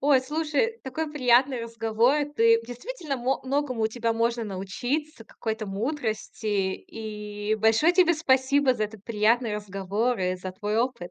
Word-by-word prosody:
Ой, 280 -2 +4
слушай, 310 - -1
такой 295 +4 -3
приятный 255 -2 +3
разговор. 230 +3 +1 0.2
Ты 230 0 +5
действительно, 285 - -5
мо 255 +2 -1
многому 265 -3 -1
у 220 - +4
тебя 230 0 -1
можно 230 +1 0
научиться, 225 +8 -3
какой-то 220 -1 -4
мудрости. 220 +1 -3
И 210 +1 -3
большое 225 +10 +4
тебе 355 -2 +5
спасибо 270 -2 +3
за 215 - 0
этот 215 -1 -9
приятный 225 +1 +2
разговор 205 +4 -2
и 185 0 0
за 185 0 -6
твой 210 +3 -3
опыт! 235 -7 -2
230 Hz, 145 wpm, -26 LUFS, 215-270 Hz, 0.2 s, Ты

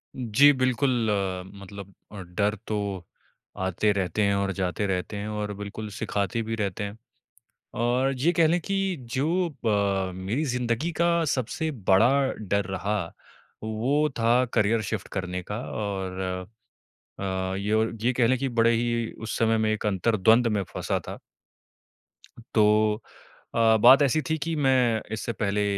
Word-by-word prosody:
जी, 130 +4 +5
बिल्कुल 130 +1 +1 0.7
मतलब 100 0 -10 0.2
अ, 105 - -8
डर 100 +4 -1
तो 100 -4 -3 0.5
आते 95 +3 +1
रहते 100 +1 -1
हैं 100 0 +2
और 100 0 0
जाते 95 +2 -1
रहते 95 +2 -2
हैं 100 +1 -4
और 105 -1 -3
बिल्कुल 105 +2 -7
सिखाते 100 +2 -2
भी 115 0 -3
रहते 105 -2 -2
हैं। 100 +1 -6 0.9
और 125 +3 +2
ज 125 - -7
ये 170 - +5
कह 165 -2 +3
ले 170 +3 +2
कि 195 +1 -1 0.2
जो 170 +7 +1 0.2
ब 100 -3 +1
मेरी 100 +11 -2
ज़िंदगी 125 +4 -1
का 170 - +4 0.2
सबसे 140 +3 -1 0.2
बड़ा 95 +5 +6 0.2
डर 100 -1 -1
रहा, 95 0 -2 0.6
वो 125 +8 +1
था 120 +3 +3
करियर 110 +2 +2
शिफ्ट 105 0 -4
करने 90 -1 -3
का 105 - -2
और 95 -3 -4 1.0
अ, 95 -1 -2
ये 100 +2 -2
और 110 +1 +1
ये 125 +2 +2
कह 120 -1 +2
लें 130 +2 +2
कि 135 +1 -1
बड़े 115 -1 +3
ही 115 0 -1
उस 110 - -5
समय 115 -1 +2
मैं 110 0 +1
एक 110 0 -2
अंतरद्वंद 110 +3 +3
में 100 - 0
फँसा - - -1
था। - - -6 1.4
तो 105 0 +3 0.5
अ, 115 -1 +5
बात 130 +5 +8
ऐसी 140 +3 +2
थी 160 - +1
कि 160 +2 -3
मैं 130 -6 +3
इससे 110 +2 -3
पहले 105 -1 0
110 Hz, 155 wpm, -26 LUFS, 100-125 Hz, 1.4 s, बात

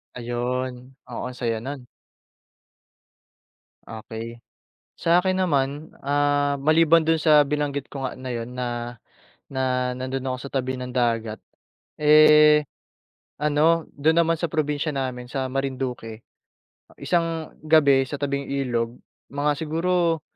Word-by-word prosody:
Ayun. 125 +1 -4 0.2
Oo - - -5
ang 125 - -5
saya 115 -2 -2
nun. 130 +2 -7 2.0
Okey. 115 +1 -8 0.6
Sa'kin 180 +3 +2
naman, 145 -3 -1
ah, 145 0 +1
maliban 160 +2 +4
dun 160 0 +2
sa 150 -1 +6
binanggit 145 -1 -2
ko 135 -2 -6
nga - - -7
na 130 -1 -6
'yon 115 +1 -5
na, 120 -1 -4 0.6
na 130 -1 0
nandun 130 +1 -4
ako 130 - -3
sa - - -9
tabi 130 -1 -1
ng 125 0 -6
dagat, 115 -3 0 0.6
eh, 150 0 +6 0.7
ano 150 +2 +2
do'n 160 +4 +2
naman 165 0 +3
sa 165 -1 -3
probinsya 150 -1 -1
namin 130 -3 -4
sa 135 -2 -2
Marinduque, 130 -4 -4 0.7
isang 165 -2 -1
gabi 150 -4 +4
sa 145 - -5
tabing 140 0 -3
ilog, 120 -4 -2 0.3
mga 145 +1 -1
siguro 165 +1 0
140 Hz, 120 wpm, -24 LUFS, 125-150 Hz, 2.0 s, sa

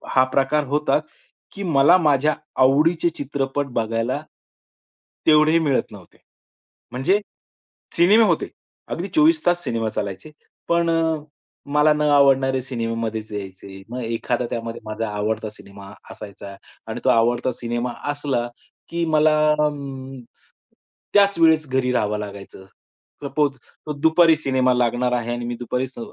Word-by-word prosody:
हा 130 - +6
प्रकार 140 +2 +1
होता, 150 +2 +1 0.5
की 200 - -7
मला 160 0 +5
माझ्या 150 -3 +2 0.3
आवडीचे 160 +6 +3
चित्रपट 140 0 -2
बघायला, 115 +5 -1 1.1
तेवढेही 155 +1 +5
मिळत 145 -5 0
नव्हते. 100 -4 -15 0.7
म्हणजे 140 +11 +1 0.8
सिनेमे 205 +7 +5
होते, 170 -6 0 0.4
अगदी 175 +4 -4
24 315 0 +4
तास 175 0 +2
सिनेमा 115 -6 -2
चालायचे. 100 +7 -5 0.4
पण 170 0 +2
अ, 165 -1 +1 0.5
मला 150 +1 +4
न 150 - -3
आवडणारे 135 -2 +4
सिनेमा 115 -3 -3
मध्येच 110 -1 -5
यायचे. 95 -1 -8
मग 125 +1 -5
एखादा 115 +2 -2
त्यामध्ये 115 0 -5
माझा 110 0 -4
आवडता 105 +1 -2
सिनेमा 100 -1 -13 0.2
असायचा 100 -1 -10 0.3
आणि - - -5
तो - - +4
आवडता 120 +2 +2
सिनेमा 120 0 -4 0.2
असला 140 -5 -2 0.4
की 170 0 -2
मला 155 -1 +3 1.8
त्याच 200 -2 +4
वेळेस 160 -2 +4
घरी 130 -1 0
राहावं 105 -3 0
लागायचं. 100 -2 -9 0.6
सपोज 140 0 0 0.3
तो 150 - -3
दुपारी 160 +3 +4
सिनेमा 130 -4 +1
लागणार 125 0 +1
आहे 120 -1 -1
आणि 120 0 -4
मी 120 0 -3
दुपारी 125 +2 -2
स 130 - -14
130 Hz, 130 wpm, -22 LUFS, 115-155 Hz, 1.8 s, हा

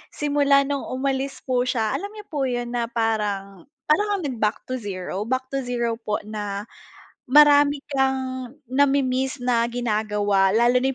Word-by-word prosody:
Simula 285 -1 +3
no'ng 280 0 -3
umalis 270 +1 -2
po 250 -1 0
siya, 220 -4 0
alam 400 - -3
niyo 420 - -9
po 280 -3 0
'yun 245 -1 -3
na 240 -1 -1
parang, 210 -4 -2 0.2
para 305 +9 +3
kang 400 -4 -1
nag-back 225 -6 -1
to 255 - -2
zero, 195 0 -5
back 260 +1 -1
to 275 - -1
zero 235 -2 -1
po 210 -2 -2
na, 205 -1 -5 0.6
marami 290 +1 +6
kang 260 -1 -1 0.2
nami-miss 265 -1 +2
na 235 -1 +2
ginagawa 210 -4 +1
lalo 240 +2 +4
na 265 - 0
250 Hz, 155 wpm, -23 LUFS, 220-275 Hz, 0.6 s, marami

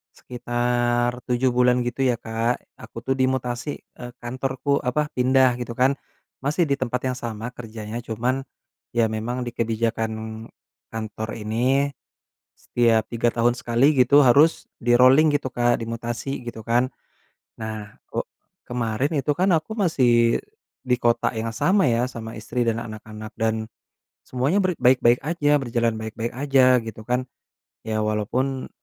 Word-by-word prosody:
sekitar 120 0 -1
7 125 +1 +2
bulan 125 0 +3
gitu 120 +2 -4
ya 125 - +2
Kak, 115 +1 -2 0.2
aku - - -12
tuh 135 - 0
dimutasi, 130 +1 -1 0.2
eee, 125 -1 -7
kantorku 130 +3 -1
apa, 150 +4 -1
pindah 130 -1 +3
gitu 120 -1 -5
kan. 135 +3 +2 0.4
Masih 150 +6 +1
di 140 0 0
tempat 125 0 -2
yang 130 - -1
sama 115 -1 -5
kerjanya, 115 -1 -7
cuman 125 +4 -2 0.5
ya 115 -1 +4
memang 120 +3 -3
di 120 - -5
kebijakan 110 -1 -2 0.4
kantor 110 0 -5
ini, 130 +6 +1 0.6
setiap 115 -2 +2
3 120 0 0
tahun 120 +1 +2
sekali 120 +5 +3
gitu, 140 +3 +6
harus 145 +6 +5 0.2
di-rolling 125 +5 +6
gitu 130 -3 -2
Kak, 120 -1 +1
dimutasi 120 +4 -4
gitu 110 -2 -7
kan. 120 +3 +2 0.7
Nah, 110 -1 -6 0.2
o - - -2 0.4
kemarin 120 +3 -1
itu 145 +1 +1
kan 180 +5 +1
aku 160 +5 -2
masih 120 - +3 0.4
di 125 -1 +2
kota 120 -1 +2
yang 115 -1 -4
sama 190 - +3
ya, 115 0 +2
sama 115 -2 -8
istri 120 +3 -2
dan 115 0 +1
anak-anak, 110 0 -9
dan 110 0 0 0.6
semuanya 135 +10 0
ber 180 -2 0
baik-baik 125 -1 +4
aja, 150 -3 +2
berjalan 120 -3 0
baik-baik 110 +1 -4
aja 130 -2 +4
gitu 110 -1 -8
kan. 125 +1 +1 0.6
Ya 110 -1 -1
walaupun 125 +5 -1
120 Hz, 140 wpm, -23 LUFS, 115-130 Hz, 0.7 s, gitu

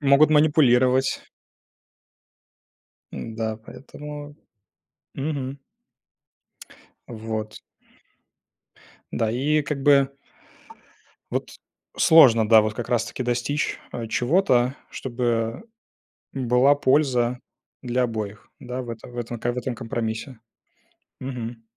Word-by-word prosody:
Могут 140 +2 +5
манипулировать. 135 -4 +4 1.9
Да, 110 -1 -4
поэтому, 145 +5 -10 0.8
мгм. 140 -1 -4 1.5
Вот. 110 -2 -5 1.5
Да, 115 - 0
и 145 +6 +1
как 140 -1 -4
бы 140 -1 +5 1.2
вот, - - -3 0.5
сложно, 125 -10 +6
да, 110 0 +7
вот 110 0 -2
как 120 +2 -6
раз 120 -3 +1
таки 130 - -5
достичь, 125 +4 -1
э, 115 -1 -4
чего-то, 125 - +2
чтобы 120 - -2 0.7
была 130 +2 +3
польза 130 -4 +2 0.4
для 125 0 0
обоих, 110 -2 -5
да, 125 -1 -5
в 120 - -10
этом, 115 +2 -9
в 120 - -8
этом 120 0 -4
ка 120 +2 -1
в 125 - -4
этом 125 0 -3
компромиссе. 115 +1 -4 0.8
Мгм. 120 -3 -6
125 Hz, 95 wpm, -24 LUFS, 115-140 Hz, 1.9 s, да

